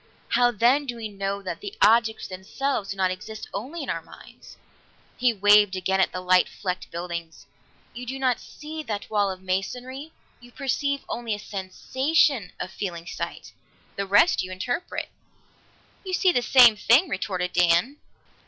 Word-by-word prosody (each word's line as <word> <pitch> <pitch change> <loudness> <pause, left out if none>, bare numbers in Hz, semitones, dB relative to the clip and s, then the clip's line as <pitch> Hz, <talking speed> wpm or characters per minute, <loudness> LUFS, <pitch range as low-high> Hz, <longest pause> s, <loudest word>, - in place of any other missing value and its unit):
How, 245 0 +4
then, 245 +6 +2
do 245 - -3
we 225 -2 -6
know 200 0 -4
that 185 - -5
the 405 +1 -7
objects 225 -1 +3
themselves 200 +5 -3
do 195 - -4
not 185 -1 +2
exist 215 +4 -7
only 270 +12 -5
in - - -6
our - - -3
minds?" - - -15 0.6
He 250 -1 +3
waved 205 -2 +5
again 190 +1 0
at - - +2
the 180 - -5
light 185 0 +4
flecked 185 -1 -5
buildings. 170 -1 -6 0.5
"You 250 +1 -8
do 265 +2 -4
not 255 -2 +1
see 310 +1 -8
that 215 -8 -5
wall 205 -2 +2
of 190 0 -7
masonry; 250 +10 -4 0.3
you 245 0 -16
perceive 280 +1 -2
only 230 -3 -3
a - - -7
sensation, 215 - 0
a - - -3
feeling 180 -3 -5
of - - -10
sight. - - -6 0.4
The 200 0 -3
rest 205 - +4
you 185 - -6
interpret." 245 - -3 0.9
"You 375 -1 -5
see 365 0 +4
the 245 - +1
same 245 -3 +7
thing," 245 - +4
retorted 185 - -3
Dan. 175 - +3
215 Hz, 170 wpm, -25 LUFS, 190-260 Hz, 0.9 s, same